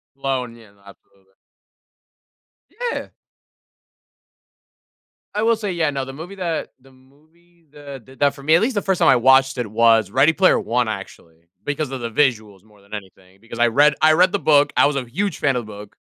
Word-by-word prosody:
Blown, 130 -3 -4
yeah, 110 -3 -18
absolutely. 95 -1 -21 1.6
Yeah! - - -6 2.2
I 210 +1 -2
will 230 0 +3
say, 210 -3 -4
yeah, 165 -4 0
no, 135 -2 -4
the 135 - -9
movie 165 +7 -10
that 170 -4 -4
the 135 +1 -22
movie 155 +6 -28
that 140 -4 -11
did 130 0 -18
that 140 -1 +2
for 140 -1 -14
me, 155 +2 +4
at 175 - +3
least 235 +2 -1
the 205 - 0
first 190 -2 -1
time 165 - +3
I - - +6
watched 130 +2 +3
it 120 -3 -3
was 110 -2 +3
Ready 140 +6 +3
Player 185 +2 +3
One, 120 0 -1
actually, 85 -5 -9 0.2
because 145 0 -3
of 130 -2 -6
the 115 -1 -5
visuals 110 -8 -1
more 105 -2 -24
than 100 +1 -18
anything, 95 -2 -11
because 115 +3 -11
I 120 - +4
read 145 +5 +3
I 155 0 +5
read 180 +4 +3
the 205 - 0
book, 145 -4 +3
I - - +4
was 145 - -2
a 130 - -3
huge 190 +11 -3
fan 135 -3 +1
of 120 - -3
book. 105 -1 -12
135 Hz, 200 wpm, -20 LUFS, 115-155 Hz, 2.2 s, I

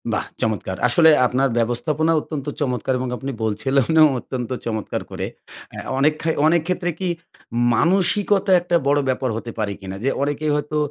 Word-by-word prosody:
বাহ - - -1 0.2
চমৎকার! 100 -4 -2
আসলে 160 +7 +5 0.2
আপনার 130 +2 +1
ব্যবস্থাপনা 145 +7 +1
অত্যন্ত 150 -3 -6 0.2
চমৎকার 130 -2 -1
এবং 130 - -2
আপনি 135 +2 -5
বলছিলেনও 135 +8 +3
অত্যন্ত 125 -1 -5 0.2
চমৎকার 110 -2 -3
করে। - - -4 0.5
আ - - -4 0.2
অনেক 150 +3 +4
খায় 160 0 0
অনেক 170 +1 +3
ক্ষেত্রে 180 -1 -1
কি 190 - -1 0.7
মানসিকতা 195 - +2
একটা 175 0 0
বড় 145 +1 +3
ব্যাপার 130 0 0
হতে 115 +1 -6
পারে 105 -2 -1
কিনা? 95 -1 -7
যে, 135 - +2
অনেকেই 145 +1 -1
হয়তো 150 +1 -2
140 Hz, 160 wpm, -21 LUFS, 120-160 Hz, 0.7 s, আসলে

